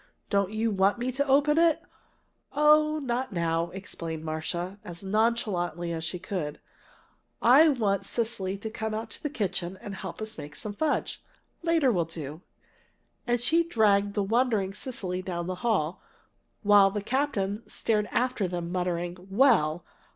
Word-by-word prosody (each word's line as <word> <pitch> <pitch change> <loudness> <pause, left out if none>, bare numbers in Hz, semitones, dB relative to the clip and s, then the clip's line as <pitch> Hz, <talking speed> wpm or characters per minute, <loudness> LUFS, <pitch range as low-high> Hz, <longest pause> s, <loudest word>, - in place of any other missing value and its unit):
"Don't 200 -1 +2
you 220 +1 0
want 195 +2 +3
me 245 +2 -2
to 280 +3 -1
open 290 +3 +4
it?" 335 -2 +4 0.7
"Oh, 305 +1 +5
not 260 -3 -2
now," 170 -2 0
explained 165 -4 -6
Marcia, 175 +5 -3
as 175 +1 -8
nonchalantly 190 -6 0
as 160 -1 -4
she 170 +3 -3
could. 175 -5 -4 0.8
"I 285 +7 +7
want 210 -8 0
Cecily 200 -5 -1
to 220 +2 -6
come 220 -1 -3
out 220 0 -5
to - - -11
the 295 - -2
kitchen 190 - -2
and 205 - -7
help 190 -2 -7
us 220 +1 -5
make 145 0 -8
some 205 +7 -5
fudge. 300 +7 -1 0.4
Later 330 -6 +3
will 175 -6 +1
do." 155 -1 -7 0.9
And 240 0 +2
she 320 +8 +3
dragged 205 -9 +2
the 205 - +1
wondering 220 -3 +1
Cecily 190 -6 -3
down 175 -2 -4
the 185 0 -5
hall, 195 -9 0 0.6
while 205 -1 +7
the 205 0 -4
captain 220 -5 -1
stared 210 -2 0
after 250 -6 0
them 175 -1 -4
muttering, 180 0 -2
"Well! 195 - +3
200 Hz, 155 wpm, -28 LUFS, 180-240 Hz, 0.9 s, I